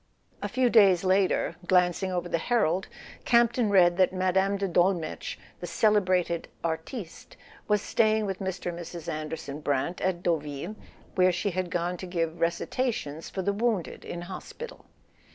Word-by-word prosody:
A - - -2
few 255 -2 +2
days 195 -6 +6
later, 190 0 +2
glancing 180 +1 +3
over 175 -1 -2
the 170 - 0
Herald, 190 -4 +1 0.4
Campton 235 -1 +3
read 175 -3 +5
that 185 -1 +4
Mme. 190 +1 +1
de 195 0 -1
Dolmetsch, 175 -2 0 0.2
"the 175 - -5
celebrated 185 -3 +2 0.2
artiste 165 +4 -5
," - - -23
was 210 -1 +2
staying 220 -1 +2
with 195 -2 -3
Mr. 190 -2 -3
and 170 - -8
Mrs. 170 -1 -8
Anderson 155 -2 -4
Brant 145 +4 -1
at 185 -2 -1
Deauville, 155 +3 -2 0.4
where 185 -1 +4
she 180 +3 -1
had 185 0 -2
gone 175 +1 -1
to 185 - -7
give 165 -2 -2
recitations 170 - -1
for 190 - -4
the 200 - +1
wounded 215 -5 -1
in 175 - -6
hospital. 190 - -8
185 Hz, 155 wpm, -28 LUFS, 170-200 Hz, 0.4 s, days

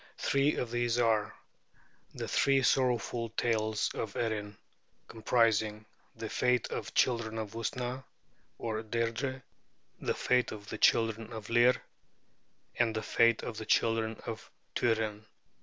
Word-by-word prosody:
Three 140 +2 +2
of 120 - -3
these 120 -1 0
are 115 -3 +2 0.8
The - - -4
Three 135 -1 +3
Sorrowful 120 -2 +1
Tales 110 -2 +1
of 105 -3 -4
Erin', 105 -3 -2 0.5
comprising 110 -2 +1 0.3
'The 115 -1 -5
Fate 125 +1 +1
of - - -3
the - - -8
Children 115 -3 +1
of 110 -2 -4
Usna' 125 +3 -3 0.5
(or 110 -1 -3
'Deirdrê'); 115 +4 -2 0.6
'The - - -1
Fate 125 -1 +2
of 105 -1 -10
the 110 - -5
Children 115 -1 +2
of 110 0 -7
Lir'; 120 +2 +5 1.0
and 115 -2 +2
'The 110 - -2
Fate 115 -1 +3
of 115 - -5
the 110 - -5
Children 115 -1 +1
of 115 -1 -6 0.3
Tuirenn'. 110 -2 0
115 Hz, 135 wpm, -31 LUFS, 110-120 Hz, 1.0 s, Lir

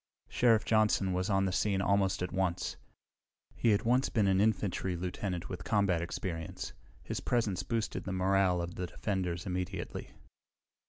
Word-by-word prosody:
Sheriff 115 -3 +3
Johnson 105 -4 +3
was 90 +3 -1
on 95 -1 +3
the 95 - 0
scene 95 +2 +1
almost 95 -1 +2
at 90 - -3
once. 95 -2 -1 0.8
He 120 - +2
had 105 0 +3
once 125 +3 +3
been 110 -4 +2
an 95 0 +3
infantry 100 -4 +1
lieutenant 90 0 -3
with 90 -2 -6
combat 100 -6 +2
experience. 85 -1 -4 0.3
His - - -3
presence 110 -7 0
boosted 115 +2 -2
the 95 - -3
morale 95 -1 +2
of 85 0 -5
the 90 - -4
defenders 90 -3 -2
immediately. 90 0 -4
95 Hz, 155 wpm, -32 LUFS, 90-105 Hz, 0.8 s, Sheriff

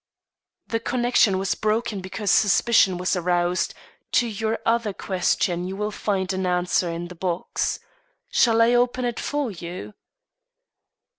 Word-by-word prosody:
"The 225 - -2
connection 240 -4 +2
was 195 0 0
broken 215 -1 -1
because 190 +2 -2
suspicion 205 -3 +4
was 180 +2 0
aroused; 175 0 0 0.4
to 245 - +4
your 220 0 -2
other 230 -3 +1
question 180 -1 0
you 190 - -5
will 210 +1 -2
find 195 -2 -1
an 190 0 -1
answer 180 0 +1
in 170 +1 -4
the 180 - -10
box. 180 0 -2 0.5
Shall 230 -1 +4
I 235 +1 +4
open 245 +1 +2
it 240 -1 -2
for 290 -5 -2
you?" 170 - -8
195 Hz, 140 wpm, -24 LUFS, 180-230 Hz, 0.5 s, suspicion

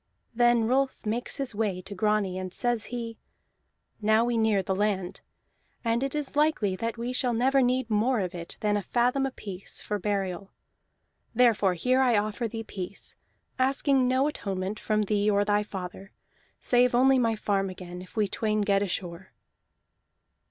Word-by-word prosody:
Then 240 0 +4
Rolf 265 +1 0
makes 230 +3 -1
his 275 -4 -2
way 205 -3 -1
to 200 - -8
Grani, 200 -2 0
and 185 -1 -5
says 240 +1 -1
he: 230 -2 -6 0.8
"Now 220 +2 +4
we 240 0 0
near 220 -3 +2
the 190 - -1
land, 190 -2 -1 0.6
and 230 +1 +1
it 275 +1 -2
is 295 -1 -3
likely 295 -11 +2
that 230 +3 -3
we 240 +2 -3
shall 250 -2 +1
never 265 +4 +3
need 255 0 +1
more 225 +3 +2
of 185 -2 -2
it 170 -1 -7
than 210 -1 +1
a 205 - 0
fathom 250 +6 +1
apiece, 200 -7 -6
for 210 -1 -3
burial. 195 -2 -2 0.9
Therefore 220 -6 +4
here 255 +9 +2
I 245 -4 +4
offer 215 +3 -1
thee 225 0 -5
peace, 200 -2 -7 0.4
asking 270 0 +3
no 260 +2 +2
atonement 195 -7 -3
from 215 -1 0
thee 205 0 +1
or 205 0 +2
thy 205 0 +2
father, 190 -1 -7 0.5
save 245 0 +3
only 265 +1 +5
my 230 -2 +2
farm 200 -2 0
again, 180 -1 -8
if 185 - -14
we 210 -1 +2
twain 215 +1 0
get 200 -1 +2
ashore." 180 -2 -4
215 Hz, 165 wpm, -27 LUFS, 195-245 Hz, 0.9 s, only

